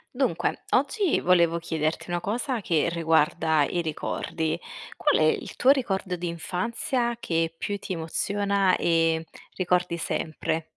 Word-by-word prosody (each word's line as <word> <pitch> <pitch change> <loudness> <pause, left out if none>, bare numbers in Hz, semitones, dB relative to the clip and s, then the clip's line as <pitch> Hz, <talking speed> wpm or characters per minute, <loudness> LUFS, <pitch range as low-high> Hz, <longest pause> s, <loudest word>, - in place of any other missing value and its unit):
Dunque 250 -11 0
oggi 355 - +2
volevo 170 -2 +3
chiederti 160 +1 -2
una 175 0 -1
cosa 240 - -2
che 165 -3 +1
riguarda 160 -2 +2
i 175 - -1
ricordi. 160 +1 -2 0.4
Qual - - +2
è - - +5
il - - -1
tuo 255 - +3
ricordo 195 -9 0
d'infanzia 230 - -2
che 165 -5 -1
più 205 +4 -3
ti 195 - -5
emoziona 195 +3 +1
e 165 -1 +2 0.3
ricordi 180 -1 +1
sempre? 160 0 -2
175 Hz, 130 wpm, -26 LUFS, 165-200 Hz, 0.4 s, è